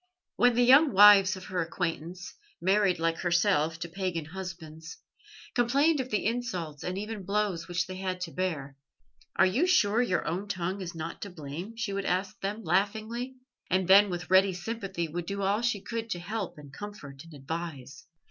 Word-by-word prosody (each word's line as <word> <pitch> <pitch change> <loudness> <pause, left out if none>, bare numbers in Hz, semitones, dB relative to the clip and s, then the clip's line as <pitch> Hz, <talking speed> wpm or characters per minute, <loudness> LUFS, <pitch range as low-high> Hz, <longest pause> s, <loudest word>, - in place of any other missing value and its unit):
When 245 -1 +4
the 245 - +4
young 270 +3 +6
wives 200 -1 +8
of 185 -1 -10
her 180 -1 -2
acquaintance, 170 +1 -4 0.3
married 190 0 +2
like 165 0 0
herself 170 -3 +2
to - - -3
pagan 175 -2 -3
husbands, 165 -2 -8 0.6
complained 275 +6 +3
of 255 -1 -3
the 210 - -1
insults 185 - -3
and 180 +1 -3
even 210 +1 -5
blows 195 -3 -1
which 175 0 -1
they 185 0 -7
had 185 -1 -3
to 175 -2 -4
bear, 155 -7 -3 0.6
"Are - - +5
you 245 - +2
sure 225 - +3
your 185 -8 0
own 185 +5 -2
tongue 185 0 -3
is 175 -2 -6
not 165 +1 -6
to 200 - -5
blame?" 175 +6 -8
she 210 -3 -2
would 200 0 -3
ask 185 +1 -1
them 210 +3 -3
laughingly; 215 +8 -1 0.3
and 185 0 +1
then 200 +2 +7
with 180 0 -5
ready 190 0 +5
sympathy 185 -2 -4
would 170 +2 -5
do 200 0 -3
all 200 +3 +1
she 235 -4 0
could 230 +1 -5
to 175 - -3
help 200 0 -5
and 145 -2 -13
comfort 150 -8 -9
and 165 -2 -13
advise. 145 -2 -7
185 Hz, 185 wpm, -29 LUFS, 170-210 Hz, 0.6 s, wives